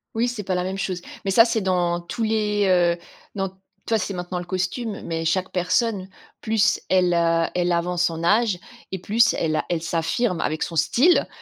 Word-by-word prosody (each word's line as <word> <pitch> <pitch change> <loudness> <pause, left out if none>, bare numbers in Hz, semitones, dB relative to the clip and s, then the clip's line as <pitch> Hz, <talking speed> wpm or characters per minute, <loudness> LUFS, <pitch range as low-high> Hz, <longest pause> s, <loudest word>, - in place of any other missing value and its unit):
Oui, 230 +2 +1
c'est 240 -4 -4
pas 185 -1 -1
la 180 - 0
même 190 +1 -3
chose, 185 -2 -3 0.2
mais 195 - -1
ça, 230 +4 +7
c'est 230 -2 0
dans 175 -2 0
tous 225 +7 -4
les, 210 -2 +1
heu, 175 -2 +3 0.4
dans 195 -1 -1
t 190 - -24 0.3
toi, 225 - +2
c'est 195 0 -3
maintenant 180 0 -4
le 175 - -6
costume, 190 +4 -3
mais 165 -1 -3
chaque 185 +3 0
personne, 185 +2 0 0.3
plus 220 -1 +2
elle, 180 -1 +3
heu, 165 -1 +2
elle 175 0 +1
avance 175 0 +1
en 165 0 -5
âge 210 +1 +2 0.3
et 190 - -3
plus 230 +5 +3
elle 155 -2 -1
a - - -1
elle 170 -2 -1
s'affirme 165 +5 -1
avec 155 +1 -2
son 170 - -5
style 245 - +3
185 Hz, 205 wpm, -23 LUFS, 175-210 Hz, 0.4 s, ça